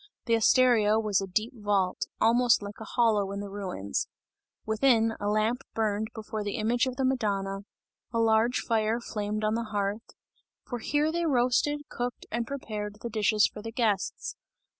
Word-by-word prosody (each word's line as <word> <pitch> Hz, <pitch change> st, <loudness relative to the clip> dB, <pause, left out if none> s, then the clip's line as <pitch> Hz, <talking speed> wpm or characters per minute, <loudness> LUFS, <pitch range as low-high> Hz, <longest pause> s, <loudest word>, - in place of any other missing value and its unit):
The 230 Hz, -, +1 dB
osteria 225 Hz, -2 st, +4 dB
was 210 Hz, -3 st, +1 dB
a 195 Hz, -, -4 dB
deep 215 Hz, +7 st, -1 dB
vault, 205 Hz, -4 st, 0 dB
almost 235 Hz, 0 st, +4 dB
like 200 Hz, 0 st, -8 dB
a 220 Hz, -, -7 dB
hollow 215 Hz, -4 st, +2 dB
in 200 Hz, -, -4 dB
the 200 Hz, -1 st, -6 dB
ruins; 185 Hz, -, -3 dB, 0.6 s
within, 225 Hz, 0 st, +3 dB
a 205 Hz, -, -2 dB
lamp 215 Hz, +4 st, +1 dB
burned 215 Hz, -1 st, 0 dB
before 220 Hz, -1 st, -4 dB
the 205 Hz, +1 st, -3 dB
image 235 Hz, +2 st, +1 dB
of 255 Hz, -, -3 dB
the 265 Hz, 0 st, 0 dB
Madonna; 200 Hz, -6 st, 0 dB, 0.5 s
a 230 Hz, -, -2 dB
large 225 Hz, +2 st, +3 dB
fire 225 Hz, 0 st, +1 dB
flamed 215 Hz, -2 st, -3 dB
on 215 Hz, 0 st, +1 dB
the 230 Hz, +1 st, -1 dB
hearth, 205 Hz, +1 st, -3 dB, 0.5 s
for 245 Hz, -2 st, -4 dB
here 295 Hz, +6 st, +1 dB
they 340 Hz, 0 st, 0 dB
roasted, 265 Hz, +2 st, +2 dB
cooked 245 Hz, 0 st, -4 dB
and 235 Hz, -1 st, -2 dB
prepared 210 Hz, -6 st, -5 dB
the 235 Hz, -, -3 dB
dishes 215 Hz, 0 st, +3 dB
for 210 Hz, -, -4 dB
the 225 Hz, +1 st, -6 dB
guests. 215 Hz, -5 st, -1 dB
220 Hz, 170 wpm, -28 LUFS, 205-240 Hz, 0.6 s, osteria